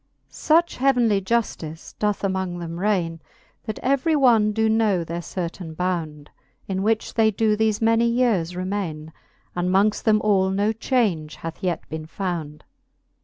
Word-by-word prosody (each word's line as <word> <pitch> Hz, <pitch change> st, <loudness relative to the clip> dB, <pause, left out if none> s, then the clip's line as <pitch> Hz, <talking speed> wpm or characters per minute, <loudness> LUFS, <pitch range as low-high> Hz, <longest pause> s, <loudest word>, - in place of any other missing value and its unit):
Such 335 Hz, +2 st, +2 dB
heauenly 245 Hz, -6 st, +3 dB
juftice 185 Hz, -7 st, -3 dB
doth 210 Hz, -1 st, 0 dB
among 190 Hz, -2 st, -1 dB
them 170 Hz, 0 st, -6 dB
raine, 180 Hz, -5 st, 0 dB, 0.5 s
That 215 Hz, -2 st, -4 dB
every 275 Hz, +5 st, +2 dB
one 235 Hz, -7 st, +4 dB
doe 220 Hz, +1 st, +1 dB
know 220 Hz, -5 st, +2 dB
their 170 Hz, +1 st, -5 dB
certaine 170 Hz, -2 st, -6 dB
bound, 160 Hz, -5 st, -3 dB, 0.4 s
In 190 Hz, -1 st, -2 dB
which 220 Hz, +2 st, 0 dB
they 220 Hz, -1 st, +4 dB
doe 215 Hz, +1 st, +1 dB
thefe 220 Hz, 0 st, 0 dB
many 230 Hz, +1 st, +3 dB
yeares 225 Hz, -8 st, +1 dB
remaine, 180 Hz, -5 st, -4 dB, 0.4 s
And 175 Hz, 0 st, 0 dB
mongft 200 Hz, +3 st, +2 dB
them 215 Hz, -1 st, +3 dB
all 195 Hz, -3 st, +3 dB
no 205 Hz, +3 st, +1 dB
change 215 Hz, -, 0 dB
hath 165 Hz, 0 st, -8 dB
yet 180 Hz, -2 st, -2 dB
beene 155 Hz, 0 st, -6 dB
found. 165 Hz, -5 st, -4 dB
195 Hz, 150 wpm, -23 LUFS, 170-220 Hz, 0.5 s, one